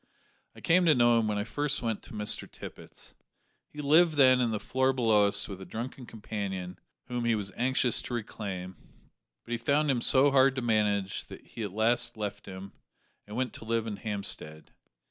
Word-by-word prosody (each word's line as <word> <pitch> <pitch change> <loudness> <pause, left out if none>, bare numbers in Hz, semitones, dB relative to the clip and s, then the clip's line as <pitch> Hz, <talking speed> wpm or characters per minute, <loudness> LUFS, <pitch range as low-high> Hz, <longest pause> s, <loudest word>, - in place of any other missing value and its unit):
I - - -13
came 180 +1 +3
to 155 -3 +5
know 120 -1 +4
him 110 - 0
when 105 -1 -1
I 105 - -1
first 145 +5 -2
went 115 -3 -2
to - - -12
Mr 105 -1 -1
Tippet's. - - -11 0.6
He 150 - -7
lived 160 +3 +4
then 130 -3 +5
in 120 - +1
the 110 -2 -2
floor 130 +4 +1
below 110 -5 +3
us 100 0 +1
with 95 -2 -8
a - - -6
drunken 120 +4 -7
companion 95 -4 -5 0.3
whom 120 -1 -3
he 120 -1 +2
was 100 -2 -4
anxious 125 0 +1
to 120 - -5
reclaim; 95 -5 -6 0.7
but 120 - -11
he 120 - 0
found 145 +4 +2
him 125 -3 0
so 135 +3 +6
hard 135 0 +4
to 130 - -3
manage 105 -4 0
that - - -12
he - - -9
at 105 -3 -3
last 115 +3 +1
left 105 -2 -5
him, 95 0 -8 0.6
and 105 - -8
went 125 -1 -2
to - - -9
live 115 0 -1
in 105 -3 -5
Hampstead. 100 -7 -4
115 Hz, 200 wpm, -29 LUFS, 105-130 Hz, 0.7 s, so